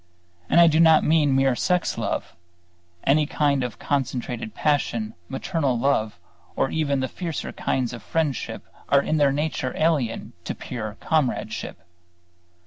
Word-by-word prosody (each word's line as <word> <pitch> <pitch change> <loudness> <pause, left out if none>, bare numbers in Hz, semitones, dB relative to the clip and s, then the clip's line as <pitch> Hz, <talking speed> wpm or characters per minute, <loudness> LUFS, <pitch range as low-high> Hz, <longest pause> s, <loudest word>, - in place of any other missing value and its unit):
And - - +5
I 170 - +9
do 160 -1 +4
not 160 -1 +6
mean 150 -3 +3
mere 135 -1 +3
sex 180 +6 0
love; - - -3 0.7
any 150 +2 +3
kind 140 -4 +1
of 125 -3 -5
concentrated 125 -5 -3
passion, 120 -7 0 0.2
maternal 140 -3 -1
love, 115 -5 0 0.4
or 135 - 0
even 140 -4 0
the 130 - 0
fiercer 165 +3 -5
kinds 125 -2 -1
of 120 - -7
friendship 155 +1 -2 0.3
are 140 0 +4
in 155 - 0
their 145 -2 +4
nature 145 -2 -2
alien 145 -8 0
to - - -3
pure 110 -3 -6
comradeship. 155 -6 -1
140 Hz, 140 wpm, -24 LUFS, 125-155 Hz, 0.7 s, I